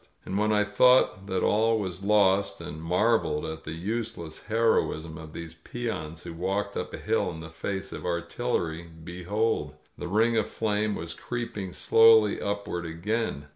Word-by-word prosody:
And 95 - -4
when 105 +2 +2
I 105 -1 +4
thought 105 -1 +4
that 95 -2 -1
all 110 +2 +3
was 95 -3 -4
lost, 100 -1 +3
and 75 +1 -7
marveled 90 -1 +1
at 80 0 -6
the 80 - -4
useless 95 -2 -4
heroism 110 -8 +1
of 80 0 -9
these 85 0 -7
peons 85 -4 -5
who 85 - -7
walked 95 +4 -2
up - - -3
a - - -7
hill - - 0
in 80 -2 -7
the 80 0 -9
face 95 +4 -4
of - - -6
artil 90 +8 -2
lery, 85 0 -3
behold! 90 -2 -1 0.2
The - - -4
ring 110 +5 +3
of 110 - +2
flame 105 -1 0
was 85 0 -5
creeping 110 -2 -5
slowly 110 0 +5
upward 100 -4 -2
again. 85 -1 -2
95 Hz, 170 wpm, -27 LUFS, 85-110 Hz, 0.2 s, slowly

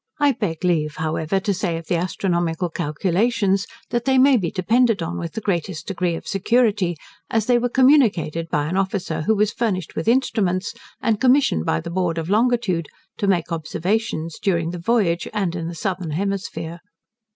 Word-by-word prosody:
I 290 -1 +4
beg 190 -9 -3
leave, 155 -4 +1
however, 160 +3 -1
to 200 +1 -1
say 180 -3 -1
of 165 - -8
the 175 - 0
astronomical 175 -1 -1
calculations, 190 +5 0 0.2
that 240 0 -1
they 265 -1 +3
may 270 +1 +6
be 185 -8 0
depended 220 +2 +2
on 170 +1 -4
with 170 -2 -5
the 220 - -4
greatest 170 -4 -2
degree 180 -3 -1
of - - -8
security, 205 -3 +1 0.3
as 225 -2 +1
they 245 0 +3
were 245 +1 0
communicated 225 - +3
by 145 -1 0
an 175 +5 -2
officer, 190 -4 -1
who 220 +8 +2
was 210 +1 +1
furnished 190 -8 -2
with 160 - -3
instruments, 215 -6 +1 0.3
and 220 -2 +1
commissioned 255 - +3
by 80 - +1
the - - -7
Board 175 -2 -1
of 165 +3 -3
Longitude, 215 - +1 0.3
to 200 - -1
make 175 -3 +1
observations 165 +1 -2
during 170 -4 0
the 175 - -6
voyage, 180 -3 +1
and 190 -4 0
in 165 -2 -3
the 170 - -6
southern 180 0 -3
hemisphere. 175 -1 -3
185 Hz, 180 wpm, -22 LUFS, 165-220 Hz, 0.3 s, may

